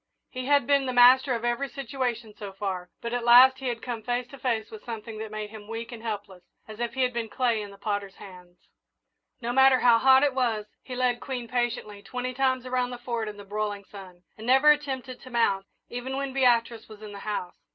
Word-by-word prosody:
He 255 0 -5
had 285 -3 +4
been 280 0 +2
the 255 - -2
master 250 +1 +6
of 230 0 -4
every 240 +3 -1
situation 245 -4 -4
so 200 -2 -8
far, 190 -2 -4
but 235 0 -4
at 245 -1 -1
last 255 +2 +7
he 265 - -4
had 235 -2 -3
come 240 -3 -4
face 245 +2 -2
to 275 - -12
face 230 -4 -1
with 220 -1 -10
something 225 -2 -7
that 220 0 -5
made 215 0 -6
him 215 -2 -11
weak 225 +2 -6
and 235 -2 -8
helpless 205 -5 -6 0.3
as 215 0 -10
if 235 -1 -3
he 265 - +1
had 250 0 0
been 235 -2 -3
clay 235 -2 0
in 205 - -7
the 200 - -14
potter's 205 -1 -3
hands. 180 -2 -13 0.8
No 240 +1 -2
matter 265 0 +5
how 235 -2 +6
hot 265 +2 +6
it 285 -2 +2
was, 235 -5 0 0.2
he 255 - -8
led 245 -1 +1
Queen 250 -3 -5
patiently 230 -4 -2
twenty 250 +3 -4
times 260 -1 0
around 250 -1 -1
the 245 - -6
Fort 235 -2 -3
in 210 -1 -7
the 205 - -11
broiling 205 0 -3
sun, 185 -3 -13 0.2
and 220 - -8
never 270 +4 +6
attempted 265 -4 -2
to 255 - -12
mount, 200 -5 +1 0.2
even 255 +2 -5
when 275 -1 -3
Beatrice 235 -4 +2
was 215 0 -12
in 210 - -8
the 200 - -8
house. 200 -4 -5
235 Hz, 230 wpm, -27 LUFS, 215-255 Hz, 0.8 s, last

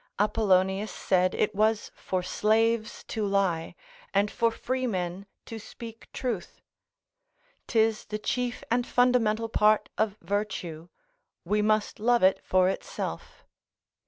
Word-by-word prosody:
Apollonius 195 -1 +2
said 185 0 +1
it - - +1
was 215 +1 +1
for 185 -1 -3
slaves 220 +4 +1
to 220 - -4
lie, 195 -5 0 0.4
and 200 +1 +3
for 230 - +2
freemen 200 -7 -3 0.2
to 225 - -7
speak 225 +1 -11
truth: 235 -9 -4 1.1
'tis 220 -2 +2
the 210 - -4
chief 245 +4 -2
and 245 +1 +1
fundamental 230 -3 +2
part 215 -1 +3
of 215 -1 +1
virtue; 175 -4 -3 0.6
we 210 0 +1
must 215 0 +1
love 240 +1 +3
it 190 +1 +4
for 185 0 +3
itself. 345 - -5
210 Hz, 120 wpm, -27 LUFS, 190-225 Hz, 1.1 s, it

